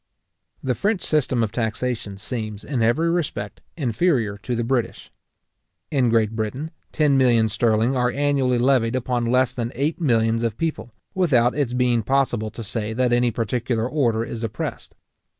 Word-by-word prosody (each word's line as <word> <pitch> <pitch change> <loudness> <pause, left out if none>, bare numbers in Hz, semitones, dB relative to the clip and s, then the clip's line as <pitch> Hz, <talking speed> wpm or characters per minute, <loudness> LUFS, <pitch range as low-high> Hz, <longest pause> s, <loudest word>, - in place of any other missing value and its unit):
The 130 - +1
French 205 - -1
system 130 -6 +1
of 105 - -2
taxation 115 -2 -3
seems, 110 -1 -5
in 135 -5 -2
every 120 +9 +2
respect, 135 - -3 0.2
inferior 120 - +1
to 120 +4 -3
the 120 - -1
British. 120 0 -2 0.8
In 130 -5 +2
Great 110 -2 +2
Britain, 120 +9 -3 0.2
ten 145 -3 +3
millions 115 -4 +3
sterling 115 +2 +2
are 125 -1 +2
annually 135 -2 +1
levied 120 -2 +2
upon 125 -1 -1
less 125 +1 +2
than 120 -1 -3
eight 150 +7 -1
millions 115 -5 +2
of 115 -2 -2
people, 160 -7 -3 0.2
without 130 -11 +3
its 140 -5 -1
being 125 -2 +2
possible 120 -2 0
to 115 +2 -8
say 110 +1 -3
that 125 +1 +1
any 120 0 +3
particular 115 +1 -1
order 120 -6 +1
is 115 0 -6
oppressed. 115 - -5
120 Hz, 160 wpm, -23 LUFS, 115-135 Hz, 0.8 s, ten